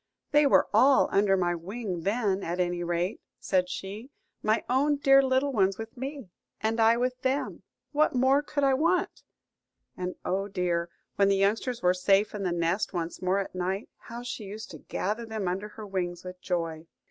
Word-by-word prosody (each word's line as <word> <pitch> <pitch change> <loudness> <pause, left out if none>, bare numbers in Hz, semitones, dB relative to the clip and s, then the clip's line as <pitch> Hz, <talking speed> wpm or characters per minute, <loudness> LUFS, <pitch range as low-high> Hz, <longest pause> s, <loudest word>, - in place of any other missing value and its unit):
"They 295 -1 +5
were - - +4
all 270 +1 +5
under 195 -1 +3
my 175 -1 +1
wing 185 +1 -5
then, 200 0 0
at 175 +1 -3
any 175 -1 0
rate," 175 +4 -2 0.2
said 180 -1 +1
she; 205 +8 -6 0.3
"my 215 +1 +1
own 280 +4 +2
dear 275 -1 +6
little 265 +1 +1
ones 195 -4 +2
with 225 0 -8
me, 265 - -6 0.3
and 225 +1 -1
I 225 +1 +5
with 250 +1 -1
them: 265 +2 -1 0.3
what 300 -2 +2
more 265 +3 +4
could 290 -1 -3
I 270 -1 +4
want?" 335 +6 +1 0.7
And, 180 0 -4
oh 195 +2 -1
dear, 175 -3 -1 0.3
when 200 - +4
the 200 - +3
youngsters 220 +4 0
were 180 0 +5
safe 195 +3 +2
in 210 - -4
the 185 -2 0
nest 170 +5 0
once 170 -1 -3
more 185 +1 +1
at 195 - -3
night, 185 +3 -3
how 235 0 -9
she 245 -3 -5
used 215 +3 -8
to - - -9
gather 215 +5 -3
them 220 -4 -4
under 190 +4 -2
her 215 0 -10
wings 180 -3 -3
with 180 0 -9
joy! 165 -2 -3
200 Hz, 190 wpm, -28 LUFS, 180-250 Hz, 0.7 s, dear